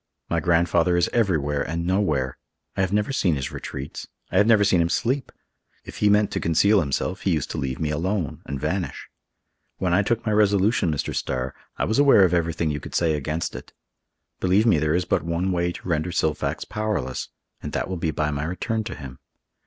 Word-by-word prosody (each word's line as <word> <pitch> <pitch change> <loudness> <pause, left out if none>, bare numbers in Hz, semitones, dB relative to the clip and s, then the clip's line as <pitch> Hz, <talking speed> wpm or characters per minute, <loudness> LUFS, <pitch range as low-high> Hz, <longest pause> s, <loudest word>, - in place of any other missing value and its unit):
"My 85 - +2
grandfather 85 +1 +2
is 85 - +1
everywhere 75 -11 +1
and 85 +3 -3
nowhere. 80 -9 0 0.4
I - - 0
have 95 -1 0
never 105 +6 0
seen 90 - +2
his 65 -1 -4
retreats. 70 +1 -7 0.2
I 90 - +1
have 105 +2 +5
never 110 -3 +5
seen 95 -4 +3
him 85 - +1
sleep. 130 +8 -1 0.5
If - - -9
he 105 - +3
meant 105 0 +3
to - - -1
conceal 100 +6 +3
himself, 90 +5 -2
he 95 - 0
used 75 - -3
to - - -3
leave 65 -1 -3
me 75 -1 -1
alone, 85 0 -2
and 70 - -4
vanish. 90 +6 -3 0.7
When 90 -2 0
I 95 - +4
took 115 +3 -1
my 110 - +1
resolution, 105 -2 +3
Mr. 75 - -3
Starr, 65 0 -2 0.2
I - - 0
was 110 +5 0
aware 135 -9 +7
of 90 - 0
everything 85 -2 0
you 75 - -3
could - - -9
say 80 -2 +2
against 75 +1 -3
it. 60 - -9 0.7
Believe 95 +4 +3
me, 105 -10 +4
there 80 +1 +1
is 90 0 0
but - - +1
one 85 +3 -1
way 85 -1 0
to 90 - -9
render 80 0 0
Silfax 80 -3 -1
powerless, 105 -12 -3 0.3
and - - -5
that - - -1
will 95 - -3
be 85 -1 -1
by 75 0 -1
my 70 +1 -2
return 110 +6 -2
to - - -5
him. 65 -3 -9
85 Hz, 210 wpm, -24 LUFS, 75-100 Hz, 0.7 s, aware